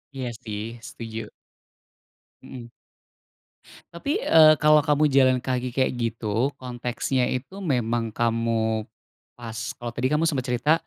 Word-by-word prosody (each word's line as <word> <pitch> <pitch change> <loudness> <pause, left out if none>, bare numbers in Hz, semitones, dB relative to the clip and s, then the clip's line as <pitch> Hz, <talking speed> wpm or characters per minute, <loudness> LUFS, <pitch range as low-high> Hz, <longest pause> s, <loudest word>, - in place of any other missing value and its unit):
Iya 130 -2 -3
sih, 105 -2 -5 0.3
setuju. 115 -1 -7 1.1
Mhm. 120 -3 -10 1.2
Tapi, 280 - -2
eee, 155 -1 +7
kalau 150 0 +5
kamu 150 0 +2
jalan 130 -1 +5
kaki 125 -1 -2
kayak 130 - +2
gitu, 115 +3 -1
konteksnya 125 0 -2
itu 135 +10 -4
memang 120 - 0
kamu 115 -1 0 0.4
pas 115 -2 -9 0.2
kalau 120 0 -6
tadi 130 +3 0
kamu 160 +2 +2
sempet 135 -5 0
cerita, 125 +5 +2
125 Hz, 120 wpm, -24 LUFS, 115-140 Hz, 1.2 s, eee